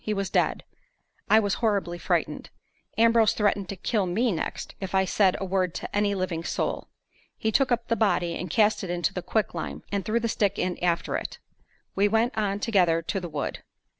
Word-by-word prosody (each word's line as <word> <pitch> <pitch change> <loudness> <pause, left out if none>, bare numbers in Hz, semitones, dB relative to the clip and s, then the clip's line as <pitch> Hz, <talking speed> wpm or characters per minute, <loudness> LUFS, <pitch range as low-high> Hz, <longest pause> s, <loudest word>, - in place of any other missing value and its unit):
He 215 - -1
was 195 -1 -2
dead. - - +1 0.7
I 215 - +7
was 205 -2 0
horribly 200 -6 0
frightened. - - -1 0.5
Ambrose 230 -1 +5
threatened 205 -2 0
to 200 - -4
kill 195 +1 0
me 225 +7 +1
next 165 - -4
if 190 0 -3
I 190 0 +4
said 190 0 +2
a 195 - -3
word 185 -2 0
to - - -5
any 205 -1 +2
living 185 -3 -2
soul. - - -2 0.5
He 220 - 0
took 265 +2 +2
up 235 -1 0
the 230 - +1
body 190 -6 +1
and 180 - -5
cast 210 +4 +2
it 185 - -5
into 175 -1 0
the 180 - -3
quicklime, 215 +3 -2
and 200 -1 -1
threw 220 +5 0
the 230 - -1
stick 205 -3 0
in 180 -1 -2
after 170 -1 +1
it. - - -6 0.6
We 200 +1 +4
went 225 +3 +1
on 205 -2 0
together 180 -7 +2
to 195 - -2
the 175 -2 -6
wood. 145 -2 -3
200 Hz, 200 wpm, -26 LUFS, 180-220 Hz, 0.7 s, I